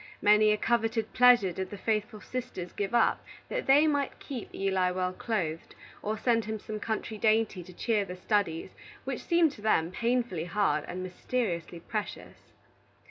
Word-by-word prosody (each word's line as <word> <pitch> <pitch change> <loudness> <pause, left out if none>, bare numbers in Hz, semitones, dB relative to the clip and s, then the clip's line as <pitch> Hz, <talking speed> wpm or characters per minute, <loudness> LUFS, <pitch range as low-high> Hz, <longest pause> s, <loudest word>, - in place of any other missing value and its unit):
Many 210 +1 +5
a 210 - +2
coveted 225 0 0
pleasure 245 -6 +6
did 190 +2 -4
the 205 - -7
faithful 215 +1 -2
sisters 250 -9 -5
give 200 +3 -2
up 235 - +3 0.3
that - - -3
they 285 +3 +6
might 285 -3 0
keep 260 -6 -7
Eli 190 -2 +1
well 180 0 -1
clothed, 175 -8 -3 0.3
or 215 +1 -2
send 230 -1 +1
him 220 0 -3
some 215 +1 -6
country 220 0 -3
dainty 215 -3 +2
to 180 - -12
cheer 210 +3 0
the 180 -2 -7
studies 185 -3 -1 0.3
which - - -4
seemed 340 -3 +3
to 215 - -13
them 175 -6 +2
painfully 235 -6 0
hard 185 -4 +1
and 185 +1 -5
mysteriously 180 -3 -3
precious. 210 +3 -6
215 Hz, 165 wpm, -29 LUFS, 185-235 Hz, 0.3 s, pleasure